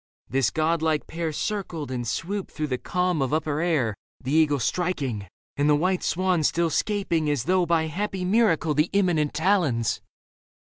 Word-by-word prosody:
This 135 Hz, -4 st, +1 dB
god 160 Hz, +1 st, 0 dB
like 160 Hz, -2 st, +1 dB
pair 165 Hz, -1 st, -3 dB
Circled 165 Hz, -4 st, -3 dB
and 120 Hz, -2 st, -3 dB
swooped 185 Hz, -, -3 dB
through 155 Hz, -, -3 dB
the 125 Hz, -, -1 dB
calm 180 Hz, -4 st, 0 dB
of 135 Hz, -, 0 dB
upper 155 Hz, -1 st, -1 dB
air, 150 Hz, -11 st, +1 dB, 0.3 s
The 130 Hz, -, -5 dB
eagle 155 Hz, -2 st, +4 dB
striking 135 Hz, -, -2 dB, 0.3 s
and 145 Hz, +1 st, +2 dB
the 150 Hz, -, +5 dB
white 180 Hz, +4 st, +1 dB
swan 185 Hz, 0 st, +1 dB
still 165 Hz, +2 st, +1 dB
'Scaping 175 Hz, -7 st, 0 dB
as 145 Hz, -5 st, 0 dB
though 180 Hz, +2 st, +2 dB
by 165 Hz, -1 st, +2 dB
happy 185 Hz, +3 st, -3 dB
miracle 180 Hz, -7 st, +2 dB
The 150 Hz, +3 st, +2 dB
imminent 175 Hz, -7 st, +2 dB
talons. 160 Hz, -, +1 dB
160 Hz, 170 wpm, -25 LUFS, 145-180 Hz, 0.3 s, the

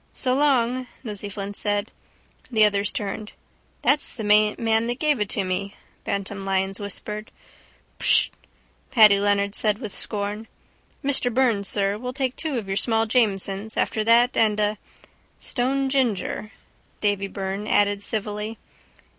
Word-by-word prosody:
—So 255 Hz, -2 st, 0 dB
long! 255 Hz, -3 st, +2 dB, 0.2 s
Nosey 205 Hz, -3 st, -6 dB
Flynn 200 Hz, 0 st, -5 dB
said. 205 Hz, +1 st, -1 dB, 0.6 s
The 220 Hz, -4 st, +5 dB
others 200 Hz, -1 st, +1 dB
turned. 210 Hz, +1 st, -5 dB, 0.5 s
—That's 290 Hz, +1 st, +2 dB
the 225 Hz, -, -5 dB
man 210 Hz, 0 st, +4 dB
now 225 Hz, -1 st, +2 dB
that 240 Hz, +2 st, -2 dB
gave 300 Hz, -3 st, +1 dB
it 210 Hz, -1 st, -1 dB
to 200 Hz, -, 0 dB
me, 190 Hz, +2 st, -3 dB, 0.3 s
Bantam 195 Hz, 0 st, -3 dB
Lyons 195 Hz, 0 st, -1 dB
whispered. 210 Hz, +2 st, -5 dB, 0.7 s
—Prrwht! -, -, +5 dB, 0.6 s
Paddy 215 Hz, -6 st, +6 dB
Leonard 200 Hz, 0 st, +1 dB
said 210 Hz, -1 st, +1 dB
with 215 Hz, -4 st, -7 dB
scorn. 210 Hz, +1 st, -4 dB, 0.6 s
Mr 265 Hz, -3 st, +2 dB
Byrne, 235 Hz, -5 st, +2 dB
sir, 200 Hz, +1 st, 0 dB
we'll 250 Hz, +1 st, -5 dB
take 265 Hz, -2 st, -2 dB
two 310 Hz, -5 st, -3 dB
of 215 Hz, -4 st, -4 dB
your 195 Hz, 0 st, -2 dB
small 225 Hz, 0 st, +2 dB
Jamesons 210 Hz, -2 st, 0 dB
after 215 Hz, -, 0 dB
that 235 Hz, +3 st, +4 dB
and 215 Hz, -2 st, +2 dB
a... 210 Hz, 0 st, 0 dB, 0.6 s
—Stone 270 Hz, +2 st, 0 dB
ginger, 230 Hz, -5 st, -1 dB, 0.5 s
Davy 205 Hz, -1 st, 0 dB
Byrne 195 Hz, +1 st, -4 dB
added 205 Hz, -1 st, +2 dB
civilly. 210 Hz, +1 st, -2 dB
210 Hz, 145 wpm, -24 LUFS, 200-235 Hz, 0.7 s, Paddy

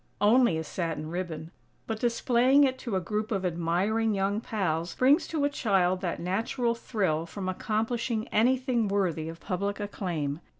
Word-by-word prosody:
Only 220 Hz, -3 st, +4 dB
a 160 Hz, -, -2 dB
satin 160 Hz, -2 st, -4 dB
ribbon, 170 Hz, -3 st, -4 dB, 0.3 s
but, 225 Hz, -1 st, -3 dB
displaying 245 Hz, +3 st, +3 dB
it 260 Hz, -1 st, +1 dB
to 235 Hz, -7 st, -3 dB
a -, -, +2 dB
group 210 Hz, +5 st, -3 dB
of 195 Hz, -3 st, -1 dB
admiring 185 Hz, +6 st, +1 dB
young 200 Hz, +2 st, 0 dB
pals 175 Hz, -7 st, -2 dB
brings 290 Hz, +6 st, +4 dB
to 305 Hz, -3 st, 0 dB
a -, -, +2 dB
child 190 Hz, -8 st, +1 dB
that 175 Hz, -3 st, -2 dB
natural 225 Hz, +7 st, 0 dB
thrill 185 Hz, -9 st, -1 dB
from 190 Hz, +1 st, -5 dB
accomplishing 225 Hz, +4 st, -1 dB
anything 245 Hz, 0 st, +2 dB
worthy 180 Hz, -6 st, 0 dB
of 165 Hz, 0 st, -9 dB
public 200 Hz, +3 st, -3 dB
acclaim. 170 Hz, -8 st, -3 dB
200 Hz, 160 wpm, -28 LUFS, 175-235 Hz, 0.3 s, Only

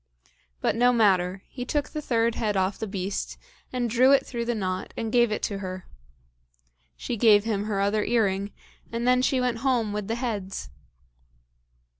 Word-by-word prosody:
But -, -, +1 dB
no 245 Hz, +2 st, +4 dB
matter, 190 Hz, -5 st, +2 dB
he 250 Hz, -, -6 dB
took 290 Hz, +3 st, -1 dB
the 305 Hz, -, -5 dB
third 230 Hz, -4 st, +1 dB
head 210 Hz, -3 st, -1 dB
off 190 Hz, +1 st, 0 dB
the 220 Hz, -, -3 dB
beast, 195 Hz, 0 st, -4 dB, 0.3 s
and 250 Hz, -1 st, -1 dB
drew 250 Hz, +4 st, +4 dB
it 275 Hz, -, +4 dB
through 235 Hz, -2 st, -4 dB
the 240 Hz, 0 st, -1 dB
knot, 185 Hz, -3 st, -3 dB
and 225 Hz, -1 st, -3 dB
gave 240 Hz, -2 st, +4 dB
it 210 Hz, -, -2 dB
to 200 Hz, -2 st, -2 dB
her. 185 Hz, -1 st, -6 dB, 1.1 s
She 240 Hz, -, -4 dB
gave 210 Hz, -2 st, +5 dB
him 210 Hz, -2 st, -1 dB
her 210 Hz, -2 st, -1 dB
other 205 Hz, +2 st, +1 dB
earring, 200 Hz, -4 st, +1 dB, 0.4 s
and 235 Hz, +1 st, -2 dB
then 250 Hz, 0 st, +4 dB
she 260 Hz, 0 st, +2 dB
went 250 Hz, -2 st, 0 dB
home 235 Hz, -5 st, +1 dB
with 210 Hz, -1 st, -3 dB
the 225 Hz, -, -1 dB
heads. 205 Hz, -, -4 dB
220 Hz, 180 wpm, -26 LUFS, 200-240 Hz, 1.1 s, gave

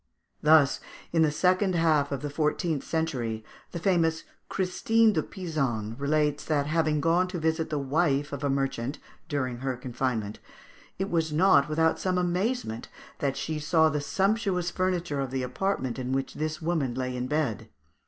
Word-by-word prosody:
Thus, 150 Hz, -2 st, +5 dB, 0.3 s
in 165 Hz, -, +4 dB
the 155 Hz, -, +5 dB
second 185 Hz, +4 st, +2 dB
half 155 Hz, -4 st, +2 dB
of 140 Hz, 0 st, -3 dB
the 145 Hz, -, -2 dB
fourteenth 155 Hz, 0 st, 0 dB
century, 125 Hz, -9 st, -2 dB, 0.3 s
the -, -, -4 dB
famous 165 Hz, -3 st, +1 dB, 0.3 s
Christine 215 Hz, +4 st, +2 dB
de 160 Hz, -, +1 dB
Pisan 135 Hz, -, -3 dB
relates 150 Hz, +1 st, +1 dB
that, 145 Hz, -3 st, +1 dB
having 155 Hz, -1 st, +1 dB
gone 170 Hz, +3 st, +3 dB
to 180 Hz, 0 st, -5 dB
visit 160 Hz, 0 st, 0 dB
the 150 Hz, -, -1 dB
wife 145 Hz, 0 st, +1 dB
of 140 Hz, 0 st, -5 dB
a 140 Hz, -, +1 dB
merchant 135 Hz, -1 st, -1 dB, 0.3 s
during 130 Hz, -5 st, -1 dB
her 130 Hz, 0 st, -3 dB
confinement, 120 Hz, -4 st, -3 dB, 0.6 s
it 190 Hz, +1 st, -2 dB
was 165 Hz, -2 st, +1 dB
not 150 Hz, -3 st, +4 dB
without 160 Hz, +1 st, +2 dB
some 185 Hz, -1 st, 0 dB
amazement 180 Hz, -, -1 dB, 0.3 s
that 140 Hz, -1 st, -1 dB
she 155 Hz, -1 st, -3 dB
saw 160 Hz, +1 st, +3 dB
the 150 Hz, -1 st, -1 dB
sumptuous 195 Hz, +1 st, 0 dB
furniture 175 Hz, -5 st, -1 dB
of 135 Hz, -1 st, -1 dB
the 130 Hz, 0 st, -2 dB
apartment 130 Hz, -1 st, -2 dB
in 130 Hz, 0 st, -2 dB
which 135 Hz, 0 st, -1 dB
this 155 Hz, +1 st, -3 dB
woman 155 Hz, -7 st, 0 dB
lay 130 Hz, -1 st, -2 dB
in 125 Hz, 0 st, -2 dB
bed 150 Hz, -7 st, 0 dB
(Fig. -, -, -16 dB
155 Hz, 170 wpm, -27 LUFS, 135-175 Hz, 0.6 s, Thus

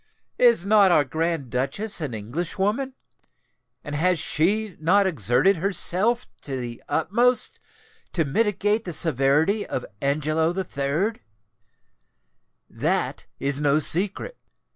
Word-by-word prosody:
Is 235 Hz, -7 st, +4 dB
not 205 Hz, -1 st, +5 dB
our 150 Hz, -, +4 dB
Grand 160 Hz, -3 st, -3 dB
Duchess 140 Hz, -, 0 dB
an 140 Hz, -7 st, -4 dB
Englishwoman? 190 Hz, -, -3 dB, 0.9 s
and 145 Hz, -, -7 dB
has 180 Hz, +4 st, +1 dB
she 190 Hz, +6 st, 0 dB
not 185 Hz, +6 st, +3 dB
exerted 155 Hz, -, +2 dB
herself 200 Hz, +6 st, +2 dB, 0.2 s
to 135 Hz, -2 st, -4 dB
the 120 Hz, -1 st, -7 dB
utmost 235 Hz, +10 st, +1 dB, 0.5 s
to 165 Hz, -3 st, +1 dB
mitigate 210 Hz, +6 st, 0 dB
the 175 Hz, -, -5 dB
severity 155 Hz, -, +1 dB
of 130 Hz, -, -5 dB, 0.2 s
Angelo 155 Hz, +4 st, 0 dB
III? 170 Hz, +5 st, -2 dB, 1.5 s
That -, -, -2 dB
is 140 Hz, +1 st, -1 dB
no 145 Hz, 0 st, +3 dB
secret. 195 Hz, -, 0 dB
170 Hz, 110 wpm, -24 LUFS, 145-205 Hz, 1.5 s, not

